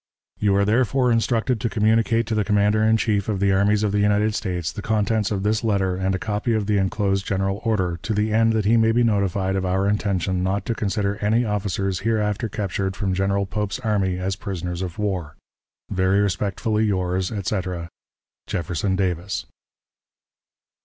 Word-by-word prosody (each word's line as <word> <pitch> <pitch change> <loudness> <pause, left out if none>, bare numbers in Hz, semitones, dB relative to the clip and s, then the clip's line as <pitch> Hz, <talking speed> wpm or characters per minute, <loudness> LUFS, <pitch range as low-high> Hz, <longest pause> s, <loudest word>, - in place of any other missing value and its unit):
"You 100 -2 +2
are 100 0 +3
therefore 125 +3 +2
instructed 115 0 +1
to 115 - 0
communicate 115 +2 +2
to 115 - -3
the 110 -1 +1
commander 105 +1 +2
in 110 +1 +4
chief 105 -2 0
of 100 -3 -1
the 100 0 +2
armies 100 +2 +2
of 105 - +1
the 105 - +1
United 105 +1 +2
States 90 -6 -2
the - - -7
contents 110 0 0
of 100 -2 -2
this 105 +2 +1
letter 100 -4 +1
and 95 +1 0
a - - 0
copy 105 +4 -1
of 110 -2 0
the 105 0 +1
inclosed 95 0 0
general 95 +1 -1
order, 95 -7 0
to 110 - -2
the 105 +1 0
end 115 0 +3
that 110 -2 0
he 115 +3 +4
may 110 0 +4
be 120 +1 +3
notified 100 -3 +1
of 95 - -1
our 95 +2 +1
intention 95 -3 0
not 95 +1 -1
to 115 - -1
consider 100 -1 -1
any 110 +3 +1
officers 100 -3 -1
hereafter 110 +1 0
captured 95 -2 -2
from 100 -3 -1
General 100 +1 0
Pope's 105 0 -3
army 100 -5 0
as 95 +1 -2
prisoners 90 -3 -5
of 90 -1 -5
war. 95 -8 -3 0.6
Very 95 0 +2
respectfully, 105 +2 0
yours, 95 -2 -1
etc., 95 -4 -3 0.6
"JEFFERSON 90 +3 -1
DAVIS." 90 0 -2
100 Hz, 180 wpm, -23 LUFS, 95-110 Hz, 0.6 s, in